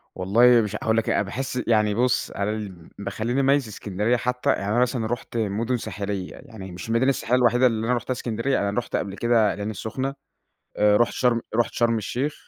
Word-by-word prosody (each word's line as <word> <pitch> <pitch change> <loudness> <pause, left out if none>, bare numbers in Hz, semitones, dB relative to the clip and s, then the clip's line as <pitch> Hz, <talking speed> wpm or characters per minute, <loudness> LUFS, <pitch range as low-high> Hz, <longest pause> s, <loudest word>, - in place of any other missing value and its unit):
والله 115 +6 +5
مش 105 -1 -3
هاقول 110 +1 0
لك 115 - 0
إيه - - +2
أنا - - +2
باحس 125 +5 -3
يعني 105 -2 +3
بُص، 125 +1 +1
أنا 100 +1 -2
اللي 100 -6 -7
بيخلّيني 110 +6 -2
أميّز 135 -2 +2
إسكندرية 105 +3 -1
حتّى، 125 +2 -1
يعني 100 +2 +1
أنا 120 - +2
مثلًا 125 -2 0
رُحت 120 0 -4
مُدن 115 +3 -1
ساحلية، 100 -4 -5
يعني 110 -8 -10
مش 90 +5 -8
المدينة 115 +4 +2
الساحلية 125 -1 +1
الوحيدة 125 +1 +4
اللي 110 -1 -1
أنا 125 - +2
رُحتها 120 - -4
إسكندرية، 120 +2 -1
أنا 100 - -4
رُحت 120 - -5
قبل 100 -1 -2
كده 115 -3 +2
العين 105 +1 -4
السخنة 130 +6 -4 0.6
آآ 105 0 +4
رُحت 120 - +2
شرم 120 -2 +1
رُحت 120 +1 +1
شرم 115 -1 +2
الشيخ. 125 +7 -2
115 Hz, 200 wpm, -24 LUFS, 105-125 Hz, 0.6 s, والله